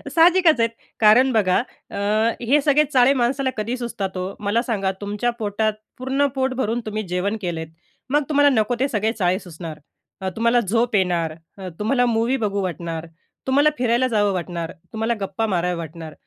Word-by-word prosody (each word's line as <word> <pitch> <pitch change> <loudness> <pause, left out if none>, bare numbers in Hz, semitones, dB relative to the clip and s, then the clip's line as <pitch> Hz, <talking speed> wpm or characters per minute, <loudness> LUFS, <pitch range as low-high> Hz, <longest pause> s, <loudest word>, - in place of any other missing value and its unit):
साहजिकच 335 -3 +5
आहेत, 230 0 +3 0.3
कारण 235 +5 +6
बघा 190 -5 +3 0.3
अ, - - -7 0.5
हे 270 +5 +3
सगळे 290 +1 +4
चाळे 255 +1 +5
माणसाला 260 +1 0
कधी 225 +4 -2
सुचतात 205 -6 -4
हो? 185 +2 -3
मला 210 +3 +1
सांगा, 200 -6 -1
तुमच्या 205 +4 -1
पोटात 215 0 0 0.2
पूर्ण 265 +2 0
पोट 265 0 0
भरून 240 -2 -1
तुम्ही 215 0 -3
जेवण 180 +5 -1
केलं 175 -3 -3
आहेत, 160 -1 -7 0.4
मग 295 +2 +2
तुम्हाला 290 -1 +5
नको 220 +2 +1
ते 270 - +2
सगळे 220 -1 0
चाळे 185 -4 +1
सुचणार. 165 -4 -9 0.4
अ, 190 - -1
तुम्हाला 235 +1 +3
झोप 230 +2 0
येणार, 175 -4 +1 0.2
अ, 190 -1 -6
तुम्हाला 245 +4 +2
मूवी 235 +2 +1
बघू 200 -2 0
वाटणार, 170 -2 -4 0.4
तुम्हाला 285 +3 +4
फिरायला 245 +1 +2
जावं 205 -4 +1
वाटणार, 170 -2 -4 0.2
तुम्हाला 225 +1 0
गप्पा 195 +3 -2
माराव्या 180 -2 0
वाटणार. 165 -1 -7
220 Hz, 175 wpm, -22 LUFS, 185-250 Hz, 0.5 s, कारण